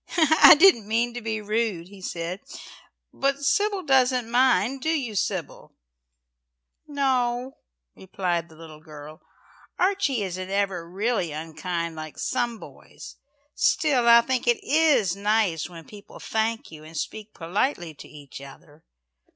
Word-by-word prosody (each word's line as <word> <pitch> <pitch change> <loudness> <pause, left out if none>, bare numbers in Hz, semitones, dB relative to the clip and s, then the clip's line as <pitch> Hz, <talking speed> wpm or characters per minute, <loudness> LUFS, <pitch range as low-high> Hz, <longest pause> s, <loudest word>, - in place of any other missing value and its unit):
"I 315 -2 +8
didn't 325 - +5
mean 235 +2 0
to 245 - -6
be 220 -1 -3
rude," 210 -5 -2
he 200 -1 -14
said. 175 +1 -5 0.7
"But 275 +1 -1
Sybil 405 +5 +1
doesn't 255 -4 +2
mind. 260 +1 +2
Do 315 - -1
you, 275 -9 -1
Sybil?" 190 -4 -4 1.1
"No," 260 -3 -1 0.4
replied 175 -3 -3
the 160 - -17
little 155 -1 -12
girl. 155 0 -12 0.6
"Archie 365 - +1
isn't 185 0 -5
ever 195 -4 -2
really 200 -2 -1
unkind 165 +2 -4
like 155 -1 -8
some 240 -1 -2
boys. - - -13 0.4
Still 270 -6 +1
I 235 0 +8
think 255 0 -2
it 240 - +2
is 290 - +2
nice 200 -5 0
when 165 -2 -12
people 205 -1 -13
thank 225 -1 -2
you 155 -1 -12
and 160 +1 -10
speak 215 0 -6
politely 175 - -2
to 140 - -13
each 145 -2 -12
other. 145 +3 -15
215 Hz, 135 wpm, -24 LUFS, 170-255 Hz, 1.1 s, I